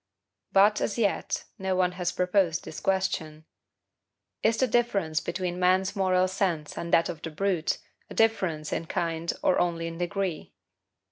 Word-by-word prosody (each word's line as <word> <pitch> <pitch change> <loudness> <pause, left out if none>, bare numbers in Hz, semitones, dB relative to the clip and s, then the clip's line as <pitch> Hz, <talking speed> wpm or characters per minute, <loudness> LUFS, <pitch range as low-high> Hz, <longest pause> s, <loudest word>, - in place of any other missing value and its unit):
But, 205 +2 +5
as 210 - -1
yet, 210 -4 0 0.2
no 190 -1 0
one 180 -1 +2
has 180 -1 -2
proposed 180 -3 +1
this 155 - -7
question: 160 -5 -1 1.0
IS 225 +1 +2
THE 260 - +3
DIFFERENCE 205 -10 +1
BETWEEN 180 +2 -3
MAN'S 185 +2 +2
MORAL 185 -1 +3
SENSE 185 -5 -1
AND 170 - -5
THAT 165 - +4
OF 165 -3 -6
THE 165 - -4
BRUTE 175 0 0 0.3
A - - -9
DIFFERENCE 185 -9 +1
IN 165 - -3
KIND 170 -2 -1
OR - - +3
ONLY 170 -1 0
IN 165 0 -6
DEGREE? 180 -2 -3
180 Hz, 155 wpm, -27 LUFS, 165-195 Hz, 1.0 s, But